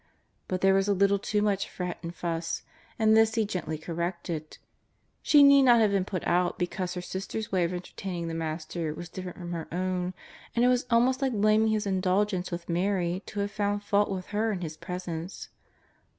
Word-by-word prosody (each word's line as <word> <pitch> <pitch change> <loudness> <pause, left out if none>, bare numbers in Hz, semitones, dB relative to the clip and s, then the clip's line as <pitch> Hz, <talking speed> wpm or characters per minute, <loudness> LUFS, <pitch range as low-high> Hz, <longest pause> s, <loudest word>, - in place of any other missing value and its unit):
But 185 0 -2
there 195 0 +5
was 195 +1 +2
a 200 - +2
little 200 +1 +3
too 210 +1 0
much 200 -1 0
fret 180 -1 -5
and 170 - -5
fuss, 165 -1 -3 0.3
and 220 -1 +4
this 225 0 +4
He 225 -2 +2
gently 175 -6 -3
cor 165 +2 -7
rected. 170 -2 -4 0.6
She 290 -1 +6
need 280 0 +8
not 245 -3 +6
have 215 -2 +4
been 195 -2 +1
put 185 -3 -4
out 175 0 +1
because 180 0 -2
her 180 - -3
sister's 195 +4 -5
way 185 -3 +2
of 170 - -2
entertaining 180 -1 -5
the 165 - -4
Master 160 0 -3
was 175 +2 -8
different 185 0 -7
from 175 -1 -6
her 165 -2 -3
owHj 180 0 -1 0.4
and 240 +1 +4
it - - +5
was 250 0 +1
almost 250 +3 +3
like 265 -2 +1
blaming 215 +1 +3
His 215 -1 +1
in 190 -2 0
dulgence 185 0 +1
with 170 -1 -5
Mary 180 0 0
to 205 - -3
have 200 0 -2
found 205 0 -1
fault 205 0 +2
with 185 -2 -3
her 220 +2 +1
in 190 -4 -3
His 160 -2 -5
Presence. 175 0 -6
185 Hz, 210 wpm, -28 LUFS, 175-210 Hz, 0.6 s, need